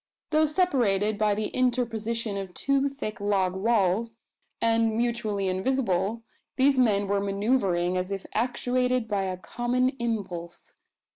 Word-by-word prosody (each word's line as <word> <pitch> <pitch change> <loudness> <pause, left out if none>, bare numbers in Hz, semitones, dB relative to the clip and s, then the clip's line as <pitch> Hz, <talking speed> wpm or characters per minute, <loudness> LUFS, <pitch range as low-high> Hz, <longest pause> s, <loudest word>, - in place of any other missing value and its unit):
Though 310 0 +4
separated 230 - +1
by 210 -1 +2
the 215 0 -2
interposition 230 -3 -1
of 195 -2 -6
two 275 0 +1
thick 235 -5 -6
log 195 -3 +1
walls, 220 +1 +1 0.4
and 225 -1 +2
mutually 220 -4 -1
invisible, 200 0 0 0.3
these 270 0 +3
men 205 -5 +3
were 200 0 +1
manoeuvring 195 -3 +1
as 180 +1 -2
if 195 -1 -4
actuated 250 +1 0
by 200 -2 -1
a 185 -1 -3
common 240 +8 0
impulse. 190 -7 -4
220 Hz, 130 wpm, -27 LUFS, 195-245 Hz, 0.4 s, Though